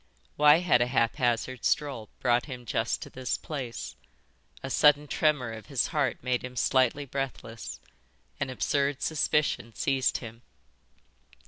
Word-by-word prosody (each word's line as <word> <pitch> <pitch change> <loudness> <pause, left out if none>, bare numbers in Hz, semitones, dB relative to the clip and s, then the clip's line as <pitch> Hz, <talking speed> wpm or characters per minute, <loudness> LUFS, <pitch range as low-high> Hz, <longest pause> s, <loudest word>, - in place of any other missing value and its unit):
Why 150 +3 +6
had 140 -9 +3
a 120 - +3
haphazard 120 0 0
stroll 135 -8 0
brought 120 +1 +2
him 125 -3 -8
just 115 0 -1
to - - -11
this 130 -2 -2
place? 130 -6 -6 0.7
A 135 - -4
sudden 150 +1 +5
tremor 150 -5 +1
of 110 -1 -9
his 140 -4 +1
heart 145 -6 0
made 125 -1 0
him 125 0 -7
slightly 130 +3 +2
breathless. 130 -4 -5 0.6
An 135 - -1
absurd 140 +1 0
suspicion 150 -7 0
seized 135 -2 +1
him. 115 -1 -10
130 Hz, 135 wpm, -28 LUFS, 120-145 Hz, 0.7 s, Why